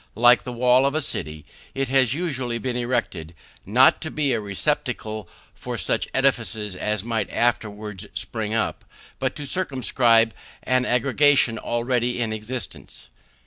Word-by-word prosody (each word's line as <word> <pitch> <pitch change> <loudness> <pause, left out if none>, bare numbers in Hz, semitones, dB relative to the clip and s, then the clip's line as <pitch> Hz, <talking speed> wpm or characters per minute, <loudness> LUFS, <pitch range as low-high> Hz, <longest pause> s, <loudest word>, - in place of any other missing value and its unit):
Like 120 +2 +5
the 125 - -4
wall 125 +2 +4
of 140 - -2
a - - +2
city, 75 - -5 0.3
it 135 0 -1
has 130 -1 +3
usually 130 -8 -2
been 120 +2 -3
erected, 120 -10 -2 0.3
not 125 +6 +5
to 155 - -4
be 145 -4 0
a 115 - 0
receptacle 105 0 -2 0.2
for - - -6
such - - -1
edifices 115 -6 0
as 105 +1 0
might 115 -2 -2
afterwards 105 -4 -2
spring 105 +4 -3
up, 115 0 -1 0.4
but - - -1
to 145 - -6
circumscribe 120 - +2 0.3
an 130 0 +1
aggregation 130 -1 +3
already 120 +1 -1
in 115 -2 -1
existence. 115 +4 -7
120 Hz, 145 wpm, -23 LUFS, 110-130 Hz, 0.4 s, Like